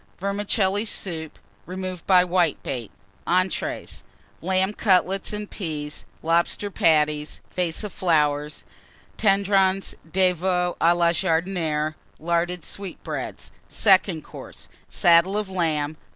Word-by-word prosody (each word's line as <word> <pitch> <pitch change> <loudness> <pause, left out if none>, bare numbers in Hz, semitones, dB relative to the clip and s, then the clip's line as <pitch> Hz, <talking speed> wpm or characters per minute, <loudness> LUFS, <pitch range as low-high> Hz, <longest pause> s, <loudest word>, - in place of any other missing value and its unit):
Vermicelli 200 +1 0
Soup, 165 -7 -4 0.3
removed 185 -1 -6
by 185 -2 +6
Whitebait. 165 - -1 0.4
Entrées. 185 +1 -1 0.4
Lamb 190 +3 +1
Cutlets 195 -2 +2
and 210 0 -4
Peas. 155 -7 -5 0.2
Lobster 170 +5 +1
Patties. 150 -3 +2
Vase 175 +1 -2
of 210 - -6 1.2
Tendrons 195 -2 +2 0.2
de 185 +1 +3
Veau 180 0 0
Flowers. - - -19
à 170 +1 +4
la 170 -1 +4
Jardinière. 160 -3 0 0.2
Larded 170 +1 -1
Sweetbreads. 195 -2 -6 0.2
Second 190 -6 +3
Course. - - -11 0.2
Saddle 175 +3 +4
of 210 -2 -2
Lamb. 155 -4 -1
180 Hz, 105 wpm, -24 LUFS, 165-195 Hz, 1.2 s, by